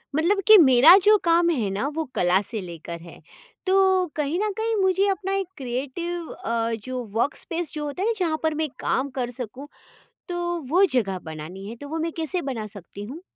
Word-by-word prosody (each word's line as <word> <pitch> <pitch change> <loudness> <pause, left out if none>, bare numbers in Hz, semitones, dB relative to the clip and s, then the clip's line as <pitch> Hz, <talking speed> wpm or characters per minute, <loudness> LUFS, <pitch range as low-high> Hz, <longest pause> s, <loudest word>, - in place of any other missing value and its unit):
मतलब 370 +6 +2
कि 435 - +10
मेरा 285 +1 +8
जो 425 +1 +6
काम 340 0 +3
है 235 -11 0
ना 205 +8 -2
वो 320 - -1
कला 180 +2 +3
से 215 +1 -2
लेकर 170 -1 -8
है। 170 -1 -13 0.4
तो 380 -1 +3
कहीं 300 +3 -1
न 425 +1 0
कहीं 450 0 0
मुझे 380 +1 +2
अपना 390 0 -1
एक 390 -2 -1
क्रिएटिव 285 +7 -4
अ, 230 0 -2
जो 255 -1 -4
वर्कस्पेस 325 +7 -1
जो 300 -1 -4
होता 295 +5 -5
है 405 - +1
ना 460 - +2
जहाँ 325 -4 0
पर 315 -1 +1
मैं 310 - -1
काम 270 +2 0
कर 245 -1 -2
सकूँ, 250 +3 -7 0.6
तो 345 -1 -2
वो 360 +6 +4
जगह 195 -7 0
बनानी 160 +5 -8
है। 230 - -7
तो 285 +4 -10
वो 325 +2 -3
मैं 330 +1 -2
कैसे 330 +3 -1
बना 225 -4 -4
सकती 200 0 -10
हूँ? 270 +11 -8
300 Hz, 200 wpm, -24 LUFS, 230-350 Hz, 0.6 s, कि